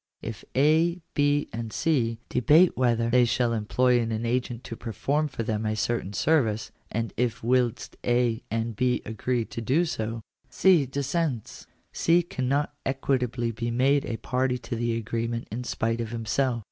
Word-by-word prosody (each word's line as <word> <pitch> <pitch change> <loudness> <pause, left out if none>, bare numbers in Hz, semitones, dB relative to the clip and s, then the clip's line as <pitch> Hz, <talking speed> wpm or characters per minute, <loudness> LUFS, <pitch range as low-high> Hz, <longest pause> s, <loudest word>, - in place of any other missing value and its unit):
If 115 0 -6
A, 160 +5 +3
B, 145 0 +2
and 115 0 -4
C, 120 -8 +1
debate 155 +8 +4
whether 115 -2 +1
they 125 0 +5
shall 120 0 +1
employ 120 +3 +2
an 115 0 -2
agent 120 0 -1
to 115 - -6
perform 140 +7 -1
for 120 -5 -4
them 110 -1 -2
a 110 0 0
certain 110 -2 -1
service, 110 -5 +1 0.2
and 115 0 -2
if 120 -2 -1
whilst 125 -1 0
A 120 -1 +1
and 115 0 -2
B 125 +3 +1
agree 115 +2 -1
to 115 - -6
do 135 +10 +2
so, 115 -6 -3 0.4
dis 140 -7 +3
sents, 150 - -2 0.3
C 170 +1 +3
cannot 145 -4 -1
equitably 125 -3 -1
be 115 +1 -3
made 135 +4 +3
a 115 - -3
party 125 +3 0
to 125 - -5
the 115 0 -1
agreement 115 +1 -3
in 120 +3 -4
spite 115 -1 -1
of 115 - -4
himself. 120 +2 0
120 Hz, 160 wpm, -26 LUFS, 115-135 Hz, 0.4 s, they